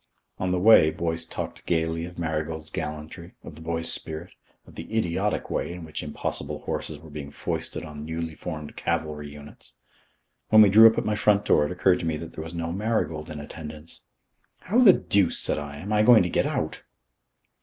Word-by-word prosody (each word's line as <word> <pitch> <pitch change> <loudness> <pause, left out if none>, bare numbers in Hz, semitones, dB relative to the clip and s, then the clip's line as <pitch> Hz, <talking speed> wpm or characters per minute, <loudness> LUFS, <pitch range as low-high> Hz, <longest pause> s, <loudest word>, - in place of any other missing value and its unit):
On 90 - -1
the 90 - +1
way 90 -4 +7
Boyce 80 0 -2
talked - - -6
gaily 80 0 0
of 90 +1 -11
Marigold's 80 -1 -3
gallantry, 75 +3 -6
of 80 - -9
the 80 - -13
boy's 80 0 -2
spirit, 80 +3 -6 0.3
of - - -16
the - - -9
idiotic 85 -6 -1
way - - -1
in 85 -1 -8
which 80 - -6
impossible 75 -1 -4
horses 75 - -4
were 80 +1 -14
being 70 -1 -7
foisted 70 - -4
on 75 -1 -8
newly 80 +1 -4
formed 75 -2 -7
cavalry 75 -2 -3
units. 75 0 -13 0.8
When 110 0 +8
we 105 - +6
drew 110 +2 +10
up 110 - -4
at - - 0
my 105 - +1
front 105 -1 +3
door, 75 - +4
it - - -7
occurred 90 0 +3
to 85 - -3
me 80 -1 -1
that 80 - -8
there 80 - -6
was 80 +2 -8
no 85 0 -3
Marigold 90 -6 -1
in 75 -1 -6
attendance. 75 +2 -9 0.6
"How 215 +7 +1
the 220 -7 +9
deuce," 100 - +1
said - - -1
I, 70 -1 -7
"am 100 +8 -4
I 105 - +4
going 110 -2 +7
to 90 - -1
get - - +1
out?" - - -3
80 Hz, 200 wpm, -26 LUFS, 75-90 Hz, 0.8 s, drew